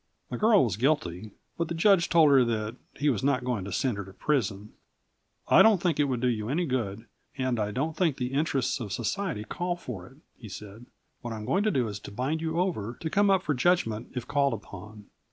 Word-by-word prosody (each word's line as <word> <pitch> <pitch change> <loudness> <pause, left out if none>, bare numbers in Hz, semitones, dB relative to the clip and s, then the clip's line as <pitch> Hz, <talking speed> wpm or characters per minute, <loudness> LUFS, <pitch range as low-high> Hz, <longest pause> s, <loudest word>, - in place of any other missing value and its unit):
The - - -2
girl 215 -2 +5
was 105 -7 -1
guilty, 110 - 0 0.3
but 170 - 0
the 170 - -4
judge 180 0 +4
told 160 -4 +5
her 135 -2 +6
that 110 -1 -2 0.2
he 145 - -1
was 115 -3 -3
not 135 -2 +1
going 125 -6 -2
to 100 - -6
send 125 +2 0
her 100 - -5
to 95 - -13
prison. 105 -6 -1 0.7
"I - - +7
don't 220 -4 +6
think 170 -4 0
it 145 - +4
would 130 -4 -2
do 125 - +2
you 110 -2 -1
any 170 +6 0
good, 115 -6 -3 0.3
and 130 -3 0
I 105 -1 0
don't 145 +9 -2
think 165 -6 +1
the 125 0 -3
interests 140 -2 0
of 110 -5 -6
society 165 - -2
call 175 +9 -3
for 110 - -8
it," 135 - -18 0.2
he 110 - -11
said. 105 +4 -10 0.3
"What 120 -1 -5
I'm 105 -1 -7
going 175 - +1
to - - +4
do 130 - +1
is 100 -2 -5
to 100 - -10
bind 135 +9 -2
you 165 +1 -1
over 125 - -2
to 160 - -3
come 205 0 +3
up 190 -1 +3
for 150 - 0
judgment 125 -6 +1
if 125 -2 -4
called 140 -2 +2
upon. 105 0 -9
130 Hz, 230 wpm, -28 LUFS, 110-160 Hz, 0.7 s, I